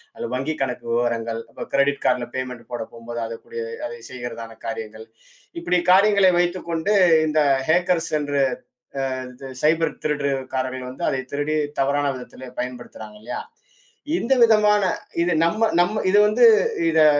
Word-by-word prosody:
அல்லது 115 - -5
வங்கி 135 +5 -1
கணக்கு 125 -3 -3
விவரங்கள், 115 -1 -1 0.3
கிரடிட் 140 +1 +1
கார்ட்ல 120 - +1
பேமண்ட் 125 -2 -5
போடப் 120 -2 -5
போகும்போது 120 0 -7
அதுக்கூடிய 115 - -7 0.2
அதை 470 - -6
செய்கிறதான 120 -2 -7
காரியங்கள். 110 -1 -6 0.6
இப்படி 180 +1 +1
காரியங்களை 195 0 +5
வைத்துக்கொண்டு 175 +1 0 0.3
இந்த 155 0 +1 0.3
ஹக்கர்ஸ் 175 0 +2
என்ற 145 -1 -3 0.7
அ - - -4 0.2
இந்த 130 +1 -10
சைபர் 160 +2 +1
திருட்டு 145 -2 0 0.2
காரர்கள் 130 -1 -3
வந்து 130 - -5
அதைத் 130 -1 -3
திருடி 145 +2 -1 0.2
தவறான 145 +1 +1
விதத்திலே 125 0 -10
பயன்படுத்துறாங்க 120 -4 -8
இல்லையா? 110 - -5 0.7
இந்த 270 - +1
விதமான 210 -2 +5 0.4
இது 175 +1 +2
நம்ம 215 +7 +2
நம்ம 210 +5 +2
இது 200 - +4
வந்து 235 +3 +4 0.4
இதை 160 -1 +5
140 Hz, 135 wpm, -22 LUFS, 120-175 Hz, 0.7 s, காரியங்களை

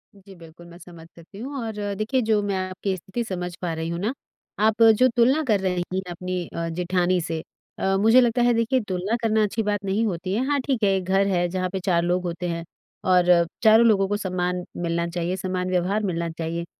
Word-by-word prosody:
जी 195 0 -15
बिल्कुल, 165 0 -14
मैं 170 - -13
समझ 170 -2 -13
सकती 170 +4 -15
हूँ 275 +5 -6
और 210 -2 -4
देखिए, 220 +6 0
जो 220 -2 +2
मैं 200 -1 -1
आपकी 190 +1 -3
स्थिति 190 +7 -4
समझ 180 -4 -5
पा 170 -2 -2
रही 160 +1 -4
हूँ 170 0 -3
ना, 215 +6 -1 0.5
आप 220 +2 +2
जो 225 +3 +6
तुलना 260 +6 +3
कर 215 -6 +2
रही 180 -2 -1
हैं 190 - 0
अपनी 180 0 -4
अ, 170 0 -4
जेठानी 180 +1 0
से 165 -1 -3 0.4
अ, 195 0 +1
मुझे 225 +5 +6
लगता 245 0 +2
है, 240 0 +4
देखिए, 230 +3 +1
तुलना 190 +4 -1
करना 220 -1 +2
अच्छी 220 +2 -1
बात 205 -1 -1
नहीं 200 +4 +1
होती 185 -1 -3
है। 240 +6 0
हाँ, 290 0 +1
ठीक 260 -6 -1
है, 200 - +4
एक 190 - -3
घर 195 +1 +2
है 175 -2 +1
जहाँ 185 0 -2
पे 190 +1 -4
4 175 -3 +2
लोग 180 +1 0
होते 175 +1 -3
हैं 170 0 -3 0.5
और 180 -1 +5 0.2
चारों 220 +1 +7
लोगों 195 -3 +3
को 205 +1 -1
सम्मान 180 -2 -2 0.2
मिलना 170 0 -1
चाहिए, 175 +1 -2
समान 185 0 -3
व्यवहार 185 +4 0
मिलना 170 -3 -2
चाहिए। 165 +1 -4
190 Hz, 220 wpm, -24 LUFS, 175-215 Hz, 0.5 s, चारों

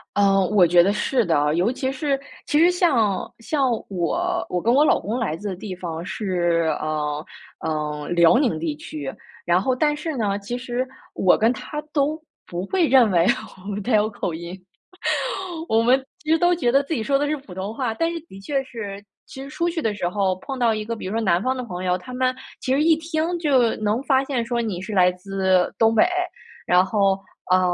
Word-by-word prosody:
呃， 195 -1 +4
我 200 -3 +5
觉 175 +1 +6
得 195 +4 +2
是 240 +2 +1
的， 150 -3 +2
尤 180 +6 +2
其 260 +1 -2
是 275 0 -1 0.3
其 295 - +1
实 340 +3 +6
像 265 - +1
像 270 +3 0 0.2
我 345 - -1
我 180 -1 -1
跟 235 +2 +2
我 285 - +5
老 - - +4
公 225 +5 -3
来 205 -10 -1
自 205 +4 -5
的 185 - -4
地 190 -1 -6
方 170 -2 -5
是， 175 -6 0
呃， 150 0 -2 0.4
嗯， 150 +1 -3
辽 170 +7 +6
宁 245 - +1
地 155 -1 -2
区， 145 -3 -6 0.3
然 175 +2 +3
后 255 +4 +1
但 295 +3 +2
是 305 +1 -4
呢， 205 -4 -1
其 205 +5 -5
实 250 +1 -3 0.3
我 185 - +4
跟 225 +2 +3
他 300 +4 -5
都 295 +1 +1 0.3
不 175 +2 -4
会 360 -5 +2
认 245 -6 +5
为 170 -1 +3 0.6
他 240 - -1
有 210 +1 +2
口 205 -5 -4
音， 170 +3 -7 1.1
我 225 +1 +3
们 255 +3 +4 0.2
其 310 - -3
实 325 - +5
都 350 +1 +4
觉 245 -8 +1
得 275 +2 +4
自 280 - -4
己 230 - -1
说 275 +3 +2
的 290 - 0
是 305 - 0
普 265 -9 -12
通 190 +4 -4
话。 245 -3 -1
但 330 +8 0
是 340 - -4
的 195 - -11
确 270 +7 -2
是 205 -6 -7 0.2
其 265 - -10
实 275 - -9
出 340 +3 -1
去 335 -1 -3
的 220 -5 0
时 195 -4 -2
候 190 +1 +1
碰 270 -1 -3
到 235 -3 +2
一 215 0 -3
个， 230 +1 -3
比 215 - -7
如 190 - -4
说 225 - 0
南 185 -3 +2
方 260 +1 0
的 255 - -3
朋 180 -4 -6
友， 180 -1 +1
他 185 +8 -10
们 255 0 +1 0.3
其 260 - 0
实 280 - +2
一 325 +1 +5
听 320 +2 -2
就 265 -8 +3
能 215 +3 0
发 270 -1 +3
现 260 -4 -2
说 235 0 -1
你 210 -6 -3
是 200 +3 -6
来 180 -2 +5
自 190 0 0
东 225 0 +4
北。 280 - +6 0.6
然 180 +1 +5
后， 195 -1 +2 0.4
嗯， 185 - +6
220 Hz, 235 characters per minute, -23 LUFS, 180-270 Hz, 1.1 s, 觉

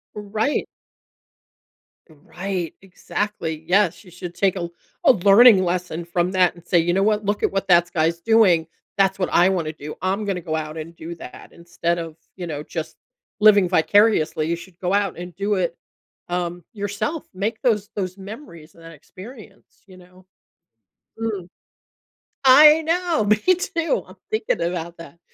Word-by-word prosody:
Right. 215 +6 -2 1.4
Right, 175 +3 -5
exactly, 180 -4 -4
yes. 195 0 +2
You 180 - -16
should 180 -1 -8
take 195 +1 +1
a 170 -2 -4 0.4
a - - +10
learning 200 0 +6
lesson 175 -1 -2
from 175 +1 -1
that 185 -1 +3
and 175 -1 -17
say, 175 - +2
"You 175 +1 +1
know 195 - +1
what? 210 0 +1
Look 205 +1 -1
at - - +2
what 195 0 -2
thats 175 -1 +4
guy's 165 +1 0
doing. 190 -6 +3 0.3
That's 195 -1 +2
what 185 - 0
I 180 +2 +5
wanna 165 -5 -2
do. 150 0 -9
I'm 195 +3 -1
gonna 190 -3 -2
go 160 -1 -3
out 155 0 -5
and 165 +2 -8
do 165 +1 -8
that," 145 - -11
instead 170 0 -3
of, 165 -2 -7 0.2
you 180 -2 -6
know, 150 -2 -5
just 160 0 -6 0.4
living 210 -3 +6
vicariously. 180 -3 +3
You 170 - 0
should 170 +1 -14
go 180 +1 -1
out 200 -3 0
and 175 0 -8
do 200 +1 -1
it, 175 -3 -2 0.5
um, 175 0 -3
yourself. 205 +10 -4
Make 210 +4 -3
those 210 -6 +1
those 185 -2 -4
memories 190 - -11
and 165 - -17
that 165 0 -11
experience, 205 - -14
you 185 -1 -15
know? 180 +1 -19 0.9
Mm. 205 -6 -3 1.0
I 300 +4 +8
know! 335 -5 0
Me 210 +1 +4 0.2
too, 350 +3 -2
I'm - - -14 0.2
thinking 435 - -1
about 170 0 -3
that. 165 0 -13
185 Hz, 165 wpm, -22 LUFS, 170-205 Hz, 1.4 s, a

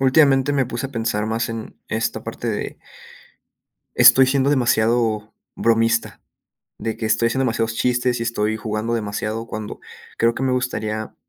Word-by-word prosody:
últimamente 135 0 +4
me 135 -3 +1
puse 125 +2 -4
a - - -14
pensar 110 -3 -1
más 110 +1 -1
en 115 -1 -7
esta - - -2
parte - - -5
de - - -4 1.2
Estoy 130 0 +7
siendo 135 +1 +2
demasiado 115 -4 +1 0.2
bromista, 115 0 +1 0.6
de 110 - -3
que 110 - -3
estoy 110 +2 +2
haciendo 130 +3 0
demasiados 115 -1 -1
chistes 125 0 +1
y - - -1
estoy 110 -1 -1
jugando 110 +2 -3
demasiado, 110 +1 -3
cuando 110 -1 -6 0.4
creo 115 0 +3
que 130 - -4
me 130 - +1
gustaría, 110 -4 -2
115 Hz, 155 wpm, -21 LUFS, 110-125 Hz, 1.2 s, Estoy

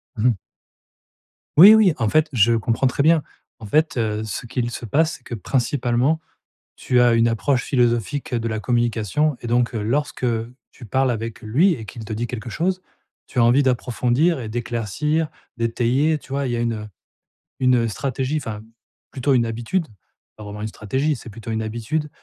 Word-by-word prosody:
Mmh 110 +3 +1
mh. 125 - +4 1.2
Oui, 200 +7 +11
oui. 205 -7 +5
En 110 -3 0
fait, 155 +3 +2
je 115 -1 +4
comprends 115 +3 +1
très 140 - 0
bien. 160 +1 +5 0.4
En 110 - -9
fait, 155 +5 +1
heu, 110 -2 -1
ce 110 +3 -5
qu'il 120 +1 -2
se 120 - -6
passe, 160 +8 +1
c'est 125 - -29
que 120 - -6
principalement, 125 +4 0 0.6
tu 125 -1 +1
as 120 -1 +5
une 115 0 +4
approche 125 +3 0
philosophique 125 +1 0
de 115 -1 -1
la 110 - -2
communication 120 +4 0
et - - -5
donc, 120 +1 +1
heu, 110 - -2
lorsque 135 +4 -1 0.5
tu 120 - -13
parles 130 +4 +1
avec 115 0 -4
lui 155 - +3
et 115 - -8
qu'il 110 +1 -9
te 110 - -6
dit 115 +3 -2
quelque 120 -1 -6
chose, 185 +8 -1 0.5
tu 130 - -7
as 120 - +5
envie 125 +5 +5
d'approfondir 130 +5 +1
et 115 - -5
d'éclaircir, 120 +7 -1 0.3
d'étayer, 120 +6 +1
tu - - -19
vois? 140 0 -1
Il 125 - -2
y 120 - 0
a - - -2
une, 120 0 0
heu, 105 -1 -5 0.7
une 125 -3 +3
stratégie 135 +5 -2
enfin 110 -7 -5 0.5
plutôt 135 +1 0
une 120 -2 +3
habitude, 120 +10 -2 0.5
pas 105 - -10
vraiment 105 +1 -7
une 110 - -2
stratégie, 130 +9 -1
c'est 115 - -11
plutôt 115 +2 -8
une 110 0 -1
habitude, 120 +8 -3
120 Hz, 190 wpm, -22 LUFS, 115-140 Hz, 1.2 s, Oui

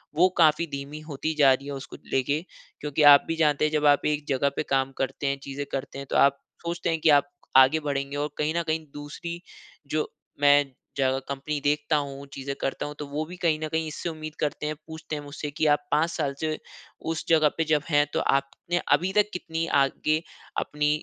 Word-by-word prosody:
वो 180 +3 +5
काफ़ी 160 0 +4
धीमी 140 +2 -5
होती 155 +3 -2
जा 135 -2 +7
रहीं 140 +2 -4
हैं 140 - -4
उसको 135 - -9 0.2
लेके। 140 +3 +1 0.4
क्योंकि 150 0 0
आप 140 - +6
भी 165 - -1
जानते 155 -2 +3
हैं, 155 - 0
जब 150 -1 +1
आप 145 -1 +5
एक 150 -1 0
जगह 140 +1 +2
पे - - -1
काम 135 0 +1
करते 135 +2 -2
हैं, 140 0 0
चीज़ें 140 +1 -5
करते 135 0 -4
हैं, 140 - -7
तो - - -2
आप 140 0 +4 0.3
सोचते 170 0 -2
हैं 165 -1 0
कि 160 - +4
आप 145 - -9 0.3
आगे 135 +4 +7
बढ़ेंगे 140 0 -2
और 145 +1 -1
कहीं 150 +1 0
न 170 - +1
कहीं 160 0 -1
दूसरी, 160 +4 -7 0.5
जो 155 +1 -1 0.3
मैं 145 -1 +5 0.3
जगह 135 -1 +2
कंपनी 140 +2 -3
देखता 150 +1 +2
हूँ, 140 -1 -4
चीज़ें 140 0 -4
करता 135 - -2
हूँ, 150 0 -6
तो 150 - -4
वो 145 +2 -2
भी 175 +3 -9
कहीं 160 -3 +1
न 155 - -2
कहीं 160 0 -1
इससे 155 +3 -4
उम्मीद 155 -1 -7
करते 150 0 -2
हैं, 155 - -2
पूछते 160 -1 -6
हैं 145 - -4
मुझसे 145 +1 -6
कि, 155 +2 -1
"आप 150 0 +4
5 160 +3 +3
साल 145 -5 -1
से 155 - -1 0.6
उस 160 - -4
जगह 155 -2 +5
पे 165 - +2
जब 150 -2 +2
हैं, 145 -2 +4
तो - - +1
आपने 140 +5 0
अभी 185 +2 +2
तक 210 0 +3
कितनी 165 -2 -3 0.2
आगे 155 +3 +1 0.4
अपनी 150 0 0
150 Hz, 220 wpm, -26 LUFS, 140-160 Hz, 0.6 s, जा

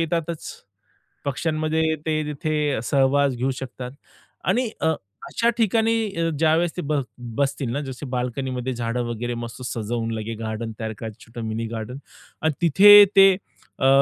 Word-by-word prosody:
येतातच. 165 0 -2 0.8
पक्ष्यांमध्ये 155 +2 0
ते 155 -1 +1
तिथे 150 -2 -1
सहवास 140 +1 +3
घेऊ 130 +3 0
शकतात. 125 -1 -6 0.5
आणि 245 -2 +1
अ, - - +2 0.4
अशा 235 0 +2
ठिकाणी 225 +1 +2 0.3
अ, 165 - +1
ज्यावेळेस 160 +1 +2
ते - - -1
बस 145 -2 +1 0.3
बसतील 140 -3 0
ना, 145 - -2
जसे 130 +3 -7
बाल्कनीमध्ये 125 +1 -2
झाडं 120 +1 -2
वगैरे 120 +1 -3
मस्त 115 +2 -10
सजवून, 115 0 -2
लगेच 110 0 -5
गार्डन 110 0 -4
तयार 110 -1 -3
करायच 110 -2 -6
छोटं 115 +1 -8
मिनी 110 +1 -2
गार्डनआणि 125 +7 -5
तिथे 205 +6 +9
ते, 195 0 +9 0.5
अ, 135 - +3
135 Hz, 140 wpm, -23 LUFS, 120-160 Hz, 0.8 s, तिथे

